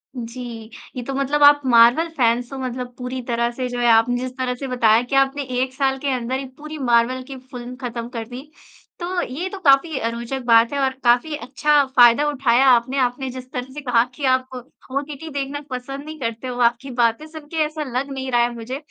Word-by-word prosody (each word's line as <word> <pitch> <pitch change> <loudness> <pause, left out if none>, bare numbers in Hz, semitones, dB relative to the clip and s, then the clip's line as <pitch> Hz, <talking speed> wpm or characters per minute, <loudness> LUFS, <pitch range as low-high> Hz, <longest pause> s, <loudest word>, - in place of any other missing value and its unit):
जी। 235 -2 -7 0.3
ये 250 - -4
तो 270 - -5
मतलब 275 +2 +1
आप 290 0 +7
मार्वल 240 +6 +5
फैन्स 240 0 +1
हो - - -5
मतलब 250 -1 -5
पूरी 255 +1 -5
तरह 235 -1 0
से 255 +1 -4
जो 245 0 -4
है 240 - +2
आपने 225 +2 +4
जिस 255 0 -4
तरह 255 -1 -1
से 270 +2 -6
बताया 235 -3 +3
कि 250 +2 -4
आपने 270 +1 +2 0.2
1 260 0 -2
साल 270 0 0
के 280 0 -1
अंदर 250 0 -2
1 265 -1 -9
पूरी 305 +1 -8
मार्वल 245 -1 +2
की 270 -1 -8
फ़िल्म 250 -1 -9
ख़त्म 235 -1 -4
कर 230 -3 -5
दी। 260 +5 -10 0.5
तो 355 +1 -2
ये 335 +8 -4
तो 395 - -7
काफ़ी 275 +2 +4
अ, 230 - -1
रोचक 235 +3 -5
बात 230 -1 +5
है 285 - -1
और 265 - +2
काफ़ी 245 +6 +3
अच्छा 290 +2 +2
फ़ायदा 245 +3 +6
उठाया 270 -3 +2
आपने। 255 +1 +3
आपने 255 +1 -1
जिस 255 0 -9
तरह 255 +1 -5
से 295 - -7
कहा 245 -4 +3
कि 285 - -4
आप 260 0 +1 0.4
ओटीटी 285 +3 -4
देखना 285 0 -4
पसंद 270 +2 -6
नहीं 310 0 -9
करते, 230 0 -4
वो 245 0 -4
आपकी 240 +3 +1
बातें 230 +6 +1
सुनके 315 0 -9
ऐसा 305 0 -4
लग 275 +2 -2
नहीं 265 -1 -4
रहा 240 -1 +3
है 240 0 +1
मुझे। 235 +3 -5
255 Hz, 220 wpm, -21 LUFS, 240-275 Hz, 0.5 s, आप